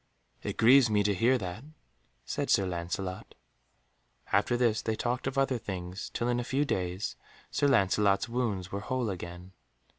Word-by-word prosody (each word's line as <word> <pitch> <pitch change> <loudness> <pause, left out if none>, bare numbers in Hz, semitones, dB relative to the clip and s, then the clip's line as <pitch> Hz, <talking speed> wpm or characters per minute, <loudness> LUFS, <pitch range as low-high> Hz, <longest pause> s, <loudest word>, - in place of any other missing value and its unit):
"It - - -4
grieves 125 +2 +6
me 105 -1 +3
to 100 0 +2
hear 120 +7 +3
that," 95 +1 -6 0.6
said - - -3
Sir 95 - +4
Lancelot. 90 +1 -4 1.0
After 120 - +2
this 115 -3 +2
they 110 - -1
talked 120 +4 -2
of 135 0 -3
other 135 -2 +2
things, 95 -3 -6
till 120 - -2
in 120 0 +1
a - - -1
few 135 +4 0
days 90 -4 -2 0.4
Sir 145 - +2
Lancelot's 100 -4 +3
wounds 115 -7 -2
were 100 - -2
whole 125 0 -2
again. 90 0 -8
105 Hz, 160 wpm, -30 LUFS, 95-120 Hz, 1.0 s, grieves